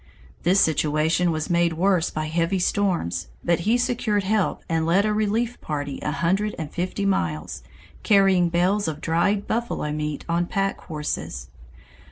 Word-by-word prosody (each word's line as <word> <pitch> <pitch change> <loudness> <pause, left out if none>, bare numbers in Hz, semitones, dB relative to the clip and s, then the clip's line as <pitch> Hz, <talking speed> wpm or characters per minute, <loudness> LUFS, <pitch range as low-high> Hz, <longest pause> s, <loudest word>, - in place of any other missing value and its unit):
The 180 +2 +3
situation 160 0 +2
was 155 +1 -3
made 170 -1 +2
worse 180 0 +2
by 155 0 -3
heavy 165 +4 0
storms, 175 - 0 0.2
but 170 -1 +2
he 240 - +4
secured 240 -5 0
help 210 0 0
and 165 -1 0
led 175 +5 +3
a 215 - +1
relief 220 +3 -1
party 145 -2 -4
a - - -2
hundred 190 +6 0
and 155 -3 -5
fifty 185 +3 -2
miles, 80 - -1 0.4
carrying 195 -4 +4
bales 185 +5 +1
of 155 -2 -3
dried 170 +6 +1
buffalo 225 -9 -2
meat 150 0 -3
on 170 +1 0
pack 195 0 -1
horses. 150 - -4
175 Hz, 155 wpm, -24 LUFS, 155-200 Hz, 0.4 s, he